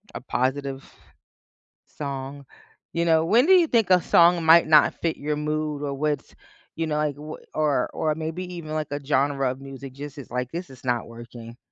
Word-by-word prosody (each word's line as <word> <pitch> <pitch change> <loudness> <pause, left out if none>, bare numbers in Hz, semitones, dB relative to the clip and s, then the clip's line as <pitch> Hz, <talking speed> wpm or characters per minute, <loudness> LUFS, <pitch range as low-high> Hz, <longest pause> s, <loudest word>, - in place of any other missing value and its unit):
a - - -5
positive 135 +1 -2 1.0
song, 140 -1 -6 0.5
you 170 0 0
know, 160 -1 +3
when 235 - +4
do 380 - +5
you 350 -3 +5
think 225 -6 +2
a 180 - +6
song 170 -1 +4
might 165 +1 +7
not 150 -2 +5
fit 165 -2 0
your 150 +1 -2
mood 150 -1 -2
or 140 -1 -2
what's 145 0 -2 0.4
you 165 0 -1
know, 150 -1 -1
like, 150 -2 -1
w 155 +1 -8 0.2
or 150 -5 +1
or 155 -1 0
maybe 160 +3 -4
even, 155 -3 -7
like, 155 -1 -2
a 145 0 -3
genre 135 -1 +1
of 130 +1 -7
music?" 135 -1 -9
just 145 +1 -9
it's 135 - -10
like, 125 0 -3
"This 175 -1 -5
is 130 0 -15
not 120 -2 -1
working." 115 0 -11
150 Hz, 195 wpm, -24 LUFS, 135-160 Hz, 1.0 s, might